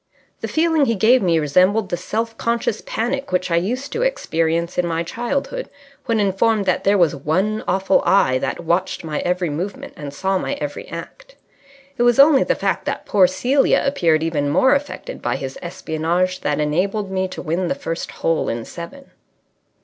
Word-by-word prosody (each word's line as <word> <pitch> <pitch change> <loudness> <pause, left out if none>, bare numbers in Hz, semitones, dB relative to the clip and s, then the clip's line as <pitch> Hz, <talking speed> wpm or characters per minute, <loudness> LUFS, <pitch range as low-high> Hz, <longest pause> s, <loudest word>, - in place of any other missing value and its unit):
The - - -4
feeling 320 -2 +2
he 230 -3 +1
gave 235 +6 +4
me 170 -4 +2
resembled 185 +7 +2
the - - 0
self 225 +6 -3
conscious 230 -2 -1
panic 270 +3 -2
which 180 -1 0
I - - +3
used 250 +11 -2
to 460 - -2
experience 170 - 0
in 175 - +1
my 165 0 -1
childhood 275 - -3 0.4
when 230 -1 +1
informed 205 +1 +2
that 185 - +1
there 200 +1 +3
was 170 -6 +3
One 185 +10 -1
Awful 190 +1 +2
Eye 130 -10 +3
that - - -3
watched 175 +2 0
my 155 -2 -3
every 180 -2 -1
movement 180 +7 -5
and 145 -3 -7
saw 190 +5 -1
my 285 - -2
every - - -5
act. - - -9 0.6
It - - -1
was 240 0 +4
only 275 -1 +7
the - - +1
fact - - -1
that - - -3
poor 195 -4 +4
Celia 250 +10 +2
appeared 170 - +2
even 150 -3 0
more 260 - +4
affected 290 - -4
by - - -1
his - - -5
espionage 170 +4 -1
that 150 0 -1
enabled 190 +7 -1
me 190 0 0
to 185 - -7
win 175 +3 -1
the - - -1
first 165 0 -4
hole 165 -1 -1
in 115 0 -3
seven. 270 +12 -10
190 Hz, 185 wpm, -20 LUFS, 170-235 Hz, 0.6 s, only